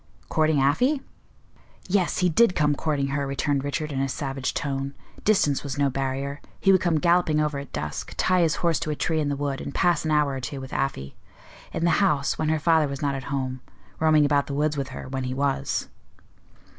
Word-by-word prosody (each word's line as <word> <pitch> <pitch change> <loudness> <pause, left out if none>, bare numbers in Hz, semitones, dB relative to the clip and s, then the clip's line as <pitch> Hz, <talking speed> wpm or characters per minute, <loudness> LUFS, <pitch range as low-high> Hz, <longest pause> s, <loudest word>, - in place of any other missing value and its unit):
"Courting 155 -2 +2
Afy?" 245 - +2 0.9
"Yes, 185 -2 +1
he - - +4
did 190 +3 +4
come 150 -2 +3
courting 145 -2 -1
her," 140 0 -1
returned 140 0 0
Richard, 150 +2 -3
in 135 - -2
a 135 - 0
savage 135 -1 -3
tone. 140 -1 -3 0.3
"Distance 150 -10 +3
was 140 -1 -5
no 140 -1 +2
barrier. 135 +1 -3 0.2
He 195 - +4
would 185 - +4
come 175 -3 +2
galloping 170 -2 +3
over 150 -2 0
at 140 - -9
dusk, 75 0 -5
tie 185 -1 +3
his 160 -3 +2
horse 165 -3 +2
to 160 -1 -3
a 150 - -1
tree 160 +2 0
in 145 -2 0
the 145 - 0
wood, 140 -1 -2
and 140 - -6
pass 175 -1 +2
an 160 - -2
hour 150 -2 +3
or 135 - -4
two 135 +2 -5
with 130 0 -8
Afy. 130 - -2 0.6
In 165 - -1
the 170 +3 +3
house, 150 -8 +2
when 155 -1 0
her 160 - +2
father 160 -1 +3
was 140 +1 -5
not 140 -1 +1
at 135 -1 -5
home; 130 -1 -3 0.4
roaming 155 -2 +4
about 145 -1 +2
the 140 - -4
woods 150 +1 +1
with 140 -2 -2
her, 130 -1 -8
when 130 0 -3
he 130 0 -3
was." 140 0 -1
145 Hz, 220 wpm, -25 LUFS, 135-155 Hz, 0.9 s, he